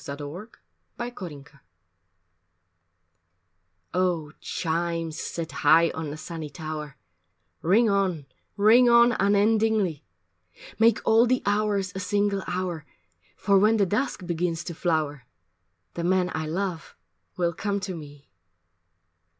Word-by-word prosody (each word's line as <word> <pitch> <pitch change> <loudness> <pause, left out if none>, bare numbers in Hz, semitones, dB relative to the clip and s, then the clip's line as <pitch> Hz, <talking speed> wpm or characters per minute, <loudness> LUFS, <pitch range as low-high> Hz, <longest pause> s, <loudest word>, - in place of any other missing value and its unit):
III 140 - -6
OVER 165 +10 -7 0.5
THE - - -3
ROOFS 150 - -9
I - - -22 2.3
OH 175 -4 0
chimes 165 -1 -2
set 165 -3 -5
high 160 +4 +4
on 160 -2 -5
the 150 - -6
sunny 160 -1 -7
tower 155 -1 -7 0.6
Ring 215 +8 +4
on, 190 -7 0 0.3
ring 230 +4 +6
on 235 0 +6
unendingly, 205 -4 +2 0.8
Make 225 -1 +4
all 225 +2 +5
the 255 +1 +1
hours 205 -2 0
a 190 - -5
single 200 +1 0
hour, 180 -3 -3 0.5
For 200 -1 +3
when 215 +3 +4
the 200 - +3
dusk 210 -1 -2
begins 170 -1 -2
to 175 - -6
flower, 155 -6 -1 0.7
The 170 - -4
man 180 0 +1
I 160 0 -3
love 175 -1 -4 0.4
will 170 -1 0
come 200 +3 -2
to 190 -2 -4
me! 145 -3 -12
180 Hz, 125 wpm, -26 LUFS, 160-205 Hz, 2.3 s, ring